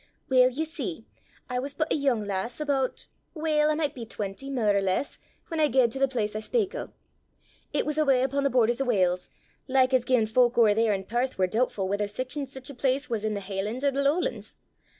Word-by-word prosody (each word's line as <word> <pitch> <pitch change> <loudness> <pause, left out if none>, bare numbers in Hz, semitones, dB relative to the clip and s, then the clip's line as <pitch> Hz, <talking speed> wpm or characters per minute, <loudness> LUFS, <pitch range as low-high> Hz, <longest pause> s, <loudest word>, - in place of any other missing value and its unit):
Weel, 255 -1 +6
ye 295 +6 -2
see, 320 - -5 0.4
I 250 -1 -2
was 280 +2 -4
but 310 +1 0
a - - +2
yoong 265 -8 +1
lass, 200 +6 -3
aboot 280 -3 -1 0.3
weel, 305 -1 +2
I 305 - +2
micht 300 -2 -1
be 245 - -7
twenty, 215 +4 -5
mair 225 -7 +1
or 200 - +3
less 195 +8 -1 0.3
whan 325 - -2
I 305 - +5
gaed 250 -3 +3
til 265 - -5
the 275 - +4
place 220 -5 -2
I - - -1
speak 395 - -1
o'. - - -5 0.8
It - - 0
was 300 0 -1
awa' 270 -4 +3
upo' 275 +2 0
the 275 - +2
borders 240 0 +2
o' - - +1
Wales, 185 -6 +1 0.4
like 260 -1 +3
as 255 -2 +4
gien 245 -3 +2
folk 240 +2 +2
ower 220 -3 +6
there 225 +1 +2
i' 195 - -3
Perth 240 +6 -2
war 190 - +3
doobtfu' 215 -2 0
whether 205 +1 -1
sic 255 +6 -4
or 285 -2 -3
sic 265 -1 -7
a - - -9
place 265 +1 -1
was 220 -2 -1
i' 215 - 0
the 205 -1 -3
hielan's 205 +6 -4
or 280 - +3
the 275 +1 -1
lowlan's. 295 +6 -1
255 Hz, 230 wpm, -27 LUFS, 215-280 Hz, 0.8 s, Weel